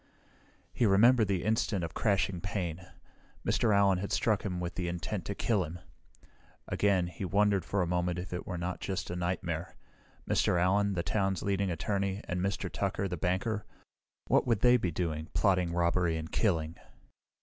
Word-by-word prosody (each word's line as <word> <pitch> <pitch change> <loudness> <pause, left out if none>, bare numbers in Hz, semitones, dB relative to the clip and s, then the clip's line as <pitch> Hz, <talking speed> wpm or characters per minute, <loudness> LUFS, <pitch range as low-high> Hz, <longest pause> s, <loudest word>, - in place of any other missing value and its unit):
He 115 - +2
remembered 110 +3 +5
the 95 -3 0
instant 110 -4 0
of 80 - -4
crashing 100 -4 0
pain. 90 -3 -4 0.6
Mr. 115 - +2
Allen 100 -2 +4
had 100 - -4
struck 110 -3 +1
with 90 -3 -3
the 90 -2 -3
intent 85 +3 -3
to 100 - -4
kill 105 -3 +1
him. 85 +2 -7 0.9
Again, 100 -3 +2
he 90 +3 -7
wondered 100 0 +2
for 95 +3 0
a - - -2
moment 90 0 0
if 90 0 -6
it 90 - -5
were 90 - -3
not 90 +1 -3
just 95 -2 -3
a - - -3
nightmare. 85 -1 -3 0.5
Mr. 90 - +2
Allen, 100 +3 +2
the 85 -2 -1
town's 95 +2 0
leading 100 -1 0
attorney, 95 +3 -1
and 90 0 -3
Mr. 100 +1 -1
Tucker, 100 - -2
the 90 - -3
banker 95 +6 -1 0.6
what - - +2
would 115 -5 +2
they 125 0 +6
be 105 -7 +1
doing, 80 -2 -3
plotting 90 -3 +2
robbery 85 -1 +1
and 80 0 -6
killing? 80 -7 0
90 Hz, 170 wpm, -31 LUFS, 85-100 Hz, 0.9 s, they